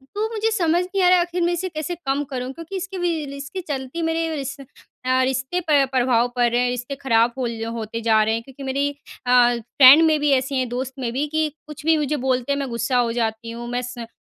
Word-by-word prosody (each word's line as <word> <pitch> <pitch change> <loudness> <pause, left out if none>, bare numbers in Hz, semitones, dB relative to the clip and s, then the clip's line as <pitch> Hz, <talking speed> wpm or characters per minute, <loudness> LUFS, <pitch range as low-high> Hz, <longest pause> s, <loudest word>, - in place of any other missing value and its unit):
तो 430 +2 0
मुझे 445 0 0
समझ 350 -5 +2
नहीं 380 +1 -1
आ 360 - +5
रहा 365 - +6
है, - - +3
आखिर 350 0 -3
मैं 345 +1 +2
इसे 350 +2 -2
कैसे 315 0 -4
कम 275 +2 +1
करूँ? 255 -1 -4
क्योंकि 330 +6 -8
इसके 380 +1 -5
वी 340 -3 -1
ल 275 - -8
इसके 285 +7 -6
चलते 285 -1 -5
मेरे 325 0 0
रिश 275 -2 -4 0.5
अ, 255 0 +2
रिश्ते 265 +6 -1
पर 290 -2 +5
प्रभाव 245 -2 +2
पड़ 245 -1 +3
रहे 240 - +2
हैं, 250 0 +1
रिश्ते 245 +2 -4
खराब 235 -2 +3
होल 235 -3 -3
होते 225 0 -5
जा 220 -1 +3
रहे 220 +1 +1
हैं 230 - -2
क्योंकि 270 +3 -13
मेरी 275 +1 0 0.4
अ, 245 -1 +5
फ्रेंड 260 +6 +7
में 310 -1 +3
भी 295 0 +2
ऐसी 265 +1 -3
हैं 255 -1 -1
दोस्त 255 +2 -4
में 245 -3 -3
भी 275 +4 -1
कि 315 0 +2 0.2
कुछ 300 -1 -10
भी 325 0 +5
मुझे 300 0 0
बोलते 255 +1 +1
हैं, 280 - -1
मैं 275 -1 -3
गुस्सा 235 +2 -1
हो 235 -1 +1
जाती 225 0 -2
हूँ। 235 +1 -7
मैं 245 +1 -1
स 245 -1 -7
265 Hz, 250 wpm, -22 LUFS, 245-320 Hz, 0.5 s, फ्रेंड